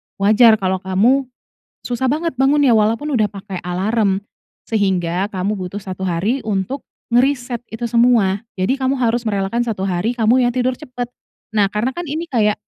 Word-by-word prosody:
wajar 220 +3 +5
kalau 190 -2 -1
kamu 220 +9 +2 0.6
susah 245 +1 -2
banget 300 0 -1
bangunnya, 275 0 +4
walaupun 225 +7 +2
udah 220 -6 +2
pakai 195 -2 -7
alarm, 195 +2 0 0.5
sehingga 190 -3 +1
kamu 195 +2 -1
butuh 190 +2 -5
1 190 -1 -5
hari 205 +10 -1
untuk 210 +7 -2 0.2
ngereset 245 -1 +1 0.2
itu 235 +1 -3
semua. 230 -5 +3 0.2
Jadi, 195 +9 0
kamu 265 0 +1
harus 240 -2 0
merelakan 205 +3 0
1 210 -5 -3
hari, 195 +5 -1
kamu 245 +2 +3
yang 240 - -1
tidur 255 0 0
cepat. 250 -4 -6 0.4
Nah, 210 -2 +3
karena 210 +5 -1
kan, 350 - -3
ini 320 +4 -4
kayak, 210 -4 +2
225 Hz, 160 wpm, -19 LUFS, 195-250 Hz, 0.6 s, wajar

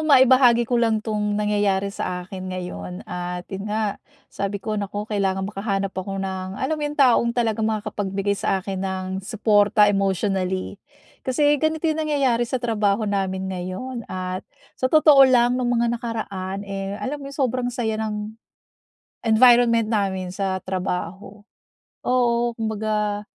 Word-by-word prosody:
maibahagi 255 -3 +6
ko 240 0 +1
lang 220 -2 +1
'tong 210 -2 -1
nangyayari 205 -2 +1
sa 180 -2 -4
akin 185 0 -7
ngayon 90 - -6
at 180 0 -5
yun 195 +2 -4
nga 210 -1 -2 0.3
sabi 200 0 -2
ko 215 +2 -5
nako 205 +1 -4
kailangan 195 -3 -1
makahanap 195 -1 -2
ako 195 +1 -4
ng, 190 0 -4
alam 265 +7 -1
mo - - -3
yung 295 0 -3
taong 245 -4 +4
talagang 220 -2 +1
makakapagbigay 205 -2 -2
sa 195 - 0
akin 190 0 -4
ng 190 -1 -3 0.2
supporta 210 0 +3
emotionally. 195 -1 0 0.4
Kasi 290 +2 +2
ganito 315 +1 0
yung 315 -1 +1
nangyayari 260 -5 +2
sa 260 - 0
trabaho 220 -3 0
namin 190 -2 -2
ngayon 190 +7 -5
at 185 0 -4 0.3
sa 255 - -1
totoo 305 -1 +6
lang 245 0 +3
nung 245 - 0
mga 235 -1 +1
nakaraan, 200 -4 -4
eh, 195 0 -4
alam 285 +6 -4
mo 275 - -7
yung 275 - -10
sobrang 255 -2 0
saya 225 -3 -2
ng 210 -1 -3 1.0
environment 235 0 +6
namin 190 -4 -1
sa 190 -1 -1
trabaho. 190 +2 -4 0.6
Oo, 240 -1 +2
kumbaga, 215 -2 -1
210 Hz, 145 wpm, -23 LUFS, 195-235 Hz, 1.0 s, maibahagi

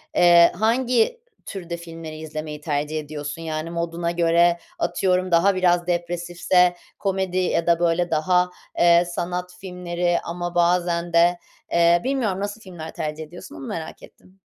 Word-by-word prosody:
eee, 170 -1 +7
hangi 240 - +1 0.2
türde 175 -3 -6
filmleri 165 -2 -9
izlemeyi 155 -1 -6
tercih 150 0 -2
ediyorsun? 150 +1 -6
Yani, 155 0 -4
moduna 170 0 -2
göre, 170 0 +3 0.2
atıyorum, 185 - 0
daha 185 +3 +4
biraz 175 -1 +2
depresifse 175 +1 +1 0.2
komedi 190 -2 -1
ya 175 -2 0
da, 170 0 +4
böyle, 175 0 +1
daha, 180 +3 +2 0.3
eee, 170 0 +5
sanat 180 +1 -4
filmleri 175 -2 -2
ama 175 +1 -5
bazen 175 0 +1
de, 175 +1 +4 0.3
eee, 170 0 +4
bilmiyorum. 245 -8 -1
Nasıl 205 +2 -4
filmler 170 -5 -9
tercih 155 0 -4
ediyorsun? 175 +3 -11
Onu 135 - -8
merak 160 -1 -6
ettim. 190 +1 -18
175 Hz, 140 wpm, -23 LUFS, 165-180 Hz, 0.3 s, eee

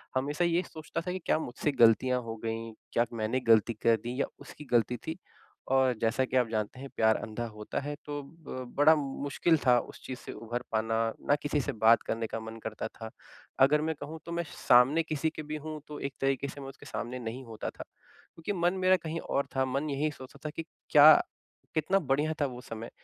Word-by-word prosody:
हमेशा 145 +6 +1
ये 170 +2 +2
सोचता 160 +1 -5
था 180 +2 -4
कि 185 - -3
क्या - - +3
मुझसे 145 +2 -2
गलतियाँ 125 +1 +4
हो 115 0 -5
गईं? 115 0 -3 0.2
क्या 120 - +3
मैंने 115 +3 0
गलती 115 +1 +5
कर 115 +1 +3
दी 125 +3 -4
या - - +2
उसकी 150 - -11
गलती 120 +1 +3
थी? 160 +8 -6 0.5
और 130 -1 +3
जैसा 115 +3 +2
कि 130 0 0
आप 125 - +3
जानते 110 +3 -2
हैं 140 +1 -7
प्यार 110 0 +4
अँधा 110 +3 -4
होता 105 -1 -5
है। 145 +1 -4
तो 145 0 -4
अ, 140 -3 -8
बड़ा 155 +2 +7
मुश्किल 145 +3 +1
था 125 -1 +6
उस - - -10
चीज़ 130 - -6
से - - -8
उभर 120 +2 -5
पाना। 110 0 +1 0.3
ना 145 - +6
किसी 145 0 +1
से - - -2
बात 115 +1 +7
करने 115 0 -1
का 115 - -4
मन 110 0 -8
करता 110 -1 -4
था। 110 -1 -9 0.6
अगर 150 +2 +3
मैं 160 +1 -1
कहूँ 155 +3 -6
तो 170 - -7
मैं 170 0 -1 0.2
सामने 130 +7 +6
किसी 155 0 -1
के 155 - -5
भी 150 +1 -5
हूँ 155 -1 -5
तो 150 - -7
एक 140 -1 -4
तरीके 135 0 +1
से 140 +1 -8
मैं 135 - -7
उसके 135 - -13
सामने 125 +2 -4
नहीं 120 +3 -5
होता 110 -2 -5
था। - - -9 0.5
क्योंकि 165 +5 -3
मन 175 +1 +3
मेरा 185 0 +6
कहीं 165 +1 -2
और 140 - -1
था 130 - +2
मन 135 +4 -1
यही 145 +2 0
सोचता 130 0 -12
था - - -1
कि, 165 - -3 0.3
क्या 150 0 +9 0.6
कितना 160 +5 +2
बढ़िया 150 0 +1
था - - +4
वो 125 -1 -8
समय 115 0 -7
135 Hz, 220 wpm, -30 LUFS, 115-155 Hz, 0.6 s, क्या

